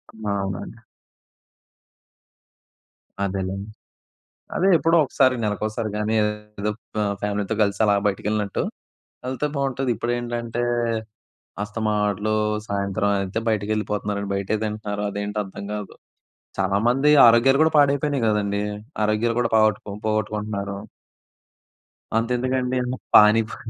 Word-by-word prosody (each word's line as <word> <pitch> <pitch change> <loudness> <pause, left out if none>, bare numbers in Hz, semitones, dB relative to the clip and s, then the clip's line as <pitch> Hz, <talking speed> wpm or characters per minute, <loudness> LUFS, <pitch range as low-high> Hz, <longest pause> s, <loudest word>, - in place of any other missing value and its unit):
ఆ! 110 -1 -5
అవునండి. 95 -1 -5 2.5
అదేలెండి. 95 +1 -3 0.9
అదే 190 - +3
ఎప్పుడో 165 +1 +3
ఒకసారి. 130 -1 +3
నెలకు 105 -1 -2
ఒకసారి 110 0 -3
గానీ, 105 +1 0
ఏదో 105 0 -4
అప్ 115 - -27 0.4
ఫ్యామిలీతో 105 +1 -1
గలిసి 100 +1 0
అలా 100 - +4
బయటికి 100 0 -1
ఎళ్ళినట్టు 105 -2 -1 0.7
ఎళ్తే 130 +3 -1
బాగుంటది. 135 -1 -1
ఇప్పుడేంటంటే, 120 0 -2 1.0
అస్తమాట్లు 105 -1 -1 0.3
సాయంత్రం 100 0 -1
అయితే 100 +3 -2
బయటికి 105 -1 -1
ఎళ్ళిపోతున్నారండి. 105 -1 -2
బయటే 100 +2 -1
తింటన్నారు. 105 -1 -3
అదేంటో 105 +1 -3
అర్థం 95 +1 -8
గాదు. 105 -2 -6 0.6
చాలామంది 115 +9 +2 0.2
ఆరోగ్యాలు 120 +4 +5
గూడా 160 - +4
పాడైపోయినయి 140 -2 +2
గదండీ! 100 -1 0 0.4
ఆరోగ్యాలు 105 +2 +1
గూడా 115 - +1
పాగొట్టుకో 110 -1 +2
పోగొట్టుకుంటున్నారు. 105 -2 -2 1.4
అంతెందుకండి. 125 +2 0 0.4
పానీపూరి 110 +1 +5
105 Hz, 100 wpm, -23 LUFS, 100-120 Hz, 2.5 s, ఆరోగ్యాలు